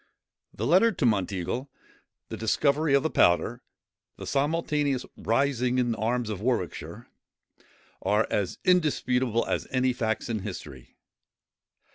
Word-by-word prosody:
The 110 - -4
letter 185 - +5
to 160 -9 -1
Monteagle, 105 +4 -1 0.6
the - - -5
discovery 140 +7 +2
of 140 - +3
the 160 - -1
powder, 85 -2 +2 0.6
the - - -8
simultaneous 145 -2 0
rising 125 +1 0
in 120 -2 +1
arms 115 +1 -1
in 100 - -4
Warwickshire,—are 110 -6 -3 1.3
as 95 -4 -1
indisputable 130 -9 +2
as - - -2
any 130 0 +1
facts 110 -3 -2
in 115 -2 -2
history. 65 -8 -8
125 Hz, 115 wpm, -27 LUFS, 110-140 Hz, 1.3 s, letter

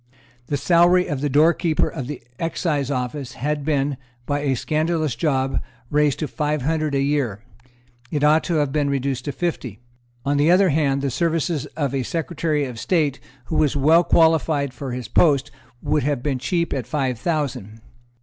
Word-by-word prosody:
The 145 - -1
salary 175 +4 +4
of 140 -3 -3
the 145 - 0
Doorkeeper 160 +2 +3
of 130 - -5
the 145 -4 -7 0.2
Excise 155 -4 -1
Office 130 0 -3
had 150 +2 -2
been, 140 -2 0 0.3
by 145 +1 -1
a 140 -2 0
scandalous 155 -1 -1
job, 135 0 0 0.3
raised 150 -1 +2
to 155 - -3
five 150 -2 -2
hundred 155 -1 0
a 135 - +2
year. 135 -8 -1 0.7
It 150 0 -2
ought 155 +2 +4
to 175 - -1
have 145 -3 +1
been 145 0 0
reduced 135 -2 -2
to 145 - -2
fifty. 135 - -3 0.5
On 140 +1 +1
the 145 +3 +3
other 185 +2 +5
hand, 140 -2 +1
the 140 - 0
services 160 0 -1
of 140 -4 -1
a 135 - 0
Secretary 155 0 -1
of 125 -3 -7
State 150 -5 0 0.3
who 155 - -2
was 150 -3 +2
well 160 +5 +5
qualified 160 -5 +2
for 130 +1 -6
his 125 0 -5
post 140 -6 +3 0.3
would 150 - +1
have 140 -2 -1
been 140 -3 -1
cheap 170 +5 -1
at 130 -5 -3
five 130 -6 -1
thousand. 130 - -3
145 Hz, 180 wpm, -22 LUFS, 135-160 Hz, 0.7 s, other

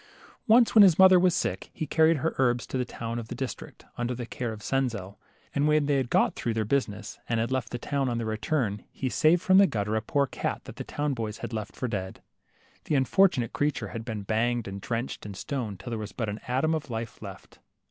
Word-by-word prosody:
Once, 230 +1 +6
when 220 - +8
his 185 -5 +7
mother 190 -1 +8
was 180 -1 +3
sick, - - -2
he 155 - -3
carried 160 +2 +4
her 160 +4 -1
herbs 120 -2 +2
to - - -7
the 130 - +1
town 115 0 -5
of 115 - -7
the - - -6
district, 130 -2 -6
under 120 +1 -1
the 120 0 -5
care 120 0 -4
of 105 -1 -9
Senzel; 115 -7 -2 0.3
and 145 +1 +2
when 150 -1 +3
they 140 -1 +2
had 130 -3 -1
got - - +3
through 115 -2 -3
their 110 -1 0
busi 135 +2 +1
ness 105 +2 -9
and 115 -1 +1
had 115 +2 -1
left 130 -2 -1
the 120 - -4
town, 135 +2 -1
on 120 - -1
their 115 - -2
return, 110 -1 -1
he 130 - -3
saved 165 +7 +3
from 190 +1 +6
the 200 - +7
gutter 105 - -2
a 110 - +1
poor 140 +5 +1
cat - - -4
that - - -11
the - - -4
town 145 -1 -2
boys 110 -3 -4
had - - -6
left 110 -2 -5
for 125 - -3
dead. 95 -4 -4 0.7
The 150 - 0
unfortunate 135 - +3
creature 145 -1 -1
had 115 -1 -6
been 110 -3 -5
banged 115 +2 0
and 100 0 -6
drenched 120 +4 -3
and 100 -2 -8
stoned, 115 -9 -4
till 120 - -7
there 115 - -2
was 105 -2 -6
but 115 -4 -3
an 105 +1 -5
atom 135 +6 +1
of 155 -3 -3
life 115 -1 -5
left. - - -10
120 Hz, 245 wpm, -27 LUFS, 110-145 Hz, 0.7 s, when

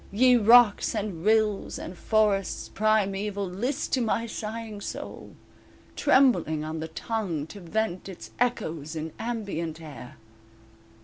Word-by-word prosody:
Ye 250 +5 +5
rocks, 230 -1 +6
and 200 -6 -3
rills 215 -1 +2
and 180 - -7
forests 205 -1 +1
primeval 205 -1 0
List 245 - -3
to 260 - +3
my 230 0 0
sighing 220 -1 -6
soul, - - -7 0.6
trembling 255 - +3
on 155 +1 -4
the 160 - -4
tongue 170 -3 -3
To 200 +6 -11
vent 190 +1 -2
its 185 - -10
echoes 165 -11 -1
in 160 0 -5
ambient 200 -9 -3
air. 145 -6 -10
205 Hz, 125 wpm, -27 LUFS, 170-225 Hz, 0.6 s, rocks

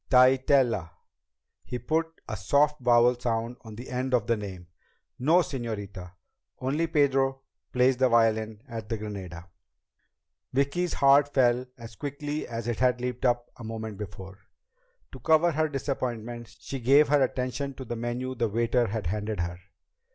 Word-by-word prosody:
"Tytell 130 0 +5
a?" 85 -5 -5 0.7
He 125 - -5
put 160 +6 -2
a - - -3
soft 140 +10 +2
vowel 120 0 +4
sound 115 0 -2
on 110 -2 -10
the 120 +4 -9
end 130 +1 0
of 115 -4 +1
the 115 - +2
name. 95 -4 -7 0.5
"No, 160 +8 +5
señorita. 105 - -6 0.4
Only 145 +6 -1
Pedro 135 -4 +2 0.3
plays 125 +1 +3
the 130 0 +3
violin 110 -2 +2
at 110 -2 -7
the 115 - -1
Granada." 95 -5 -7 1.1
Vicki's 140 +7 0
heart 140 +1 +5
fell 125 -1 +3
as 115 -2 -10
quickly 145 +4 -4
as 115 -1 -5
it 120 -2 -2
had 125 -1 +3
leaped 125 +1 -3
up 120 -1 +1
a - - -10
moment 110 -2 -6
before. 100 -1 -8 0.7
To - - -10
cover 160 +2 +4
her 155 0 0
disappointment, 120 -4 -4
she 135 - -6
gave 140 +5 +5
her 145 -1 +4
attention 130 +1 -1
to 130 - -8
the 120 - -4
menu 120 +2 -3
the 115 -2 -1
waiter 115 +2 +1
had 105 -1 -3
handed 105 +1 -2
her. 85 +1 -4
120 Hz, 160 wpm, -27 LUFS, 110-135 Hz, 1.1 s, Tytell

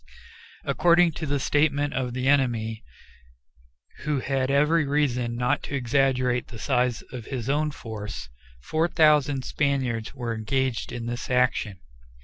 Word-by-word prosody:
According 175 0 +4
to 155 0 -5
the 140 0 0
statement 145 +1 +1
of 125 -2 -2
the 130 0 -1
enemy, 120 -6 +1 1.2
who 150 -2 -1
had 135 0 -1
every 150 +4 +3
reason 130 -5 0
not 125 +4 0
to 140 - -4
exaggerate 125 -1 +1
the 115 - -10
size 125 +1 0
of 120 -3 -7
his 125 -4 -5
own 150 +1 +1
force, 105 - -7 0.4
4,000 150 -4 +3
Spaniards 130 -5 -1
were 120 -3 -3
engaged 125 +2 -1
in 120 -1 -5
this 120 +1 -4
action. 125 -6 +1
130 Hz, 130 wpm, -25 LUFS, 120-145 Hz, 1.2 s, According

